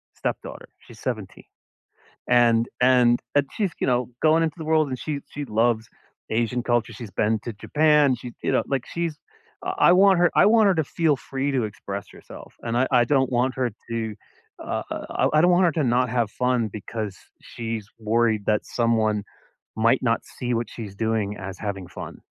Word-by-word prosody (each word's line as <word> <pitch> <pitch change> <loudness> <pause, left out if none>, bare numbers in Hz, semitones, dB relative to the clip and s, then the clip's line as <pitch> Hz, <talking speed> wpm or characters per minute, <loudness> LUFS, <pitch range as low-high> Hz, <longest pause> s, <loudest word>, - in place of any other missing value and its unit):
stepdaughter. - - -5
She's - - -16
17. - - -5 0.8
And 120 -1 +4
and 125 -1 +5 0.2
and 145 -1 +4
she's, 200 -5 -1
you - - +2
know, 125 -1 +1
going 160 +1 +4
into 160 - -1
the 160 - -6
world, 155 -1 +3
and 130 - -3
she 150 -3 -3
she 145 - -5
loves 110 -1 +1 0.4
Asian 120 +2 0
culture. 120 -1 0
She's 110 -1 -9
been 110 +3 +1
to 120 - -4
Japan. 150 +4 +3
She, 120 0 -9
you - - +1
know, - - +2
like, 135 -3 -1
she's 170 -3 -2 0.6
I - - +6
want 190 0 +5
her 175 0 +4
I - - +6
want 220 -1 +5
her 190 - +3
to 160 - +1
feel 160 0 +1
free 135 +2 -3
to 130 -3 +1
express 100 -1 -6
herself, - - -13
and 115 0 -1
I 130 +2 +2
I 125 -2 +5
don't 130 0 +2
want 125 +1 +1
her 130 -2 0 0.2
to, 110 -2 -3 0.5
uh, - - -3
I - - -1
I 155 - +5
don't 175 +2 +5
want 180 +1 +4
her 170 - +3
to 155 - 0
not 125 0 +2
have 115 -2 0
fun 125 -3 0
because 105 0 -5 0.3
she's 115 -2 -5
worried 110 -1 +1
that 105 -1 +1
someone 110 -3 +1 0.5
might 115 +3 +3
not 115 -2 +1
see 125 -1 -4
what 115 -1 -1
she's 105 -4 -8
doing 110 -1 -1
as 95 -1 -7
having 100 -3 -4
fun. 85 - -8
120 Hz, 190 wpm, -24 LUFS, 110-140 Hz, 0.8 s, I